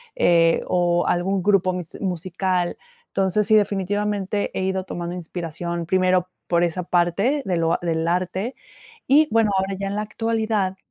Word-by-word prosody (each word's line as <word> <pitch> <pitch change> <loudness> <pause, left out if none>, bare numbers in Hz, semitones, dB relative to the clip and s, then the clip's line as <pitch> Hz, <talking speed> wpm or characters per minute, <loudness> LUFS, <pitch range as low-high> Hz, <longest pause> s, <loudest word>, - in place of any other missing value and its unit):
eh, 165 -1 +4
o 175 -1 +1
algún 185 +2 +1
grupo 190 -2 +3
musi 180 -3 -7
musical. 180 0 -1 0.3
Entonces, 195 +2 0
sí, 220 - +5
definitivamente, 205 0 0
he - - -1
ido 190 0 -1
tomando 175 -1 -5
inspiración, 170 0 -5
primero, 185 -1 +2 0.2
por 170 0 +2
esa 175 +1 -1
parte 180 - +1
de 180 -2 0
lo 165 0 +1
del 165 -1 -1
arte. 185 +7 -1 0.5
Y, 300 +4 +5
bueno, 225 -2 +3
ahora 190 +1 0
ya 195 - -2
en 200 - -3
la 210 - -1
actualidad, 220 -3 -1
185 Hz, 155 wpm, -22 LUFS, 175-205 Hz, 0.5 s, sí